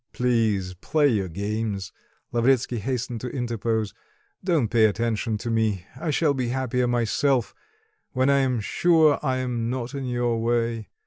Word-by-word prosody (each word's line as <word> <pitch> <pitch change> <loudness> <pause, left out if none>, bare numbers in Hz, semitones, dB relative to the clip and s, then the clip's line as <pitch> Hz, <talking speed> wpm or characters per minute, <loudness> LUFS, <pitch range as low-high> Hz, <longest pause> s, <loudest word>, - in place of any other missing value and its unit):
"Please, 110 -7 +1
play 145 - +1
your 100 -6 0
games," 100 +1 -3 0.4
Lavretsky 120 0 +2
hastened 125 0 -3
to 125 - -4
interpose; 115 -4 -2 0.5
"don't 165 -10 +2
pay 115 -1 +4
attention 110 +1 0
to 120 +2 -4
me. 110 -5 0
I 145 +5 -4
shall 150 0 +2
be 130 -3 -2
happier 125 0 0
myself, 120 +1 +1 0.6
when 130 +1 +1
I 140 0 +4
am 130 -4 +1
sure 160 +5 +3
I 130 -3 0
am 120 -2 -2
not 125 +1 -3
in 135 -1 -4
your 120 -2 0
way. 115 -1 0
120 Hz, 150 wpm, -25 LUFS, 110-130 Hz, 0.6 s, pay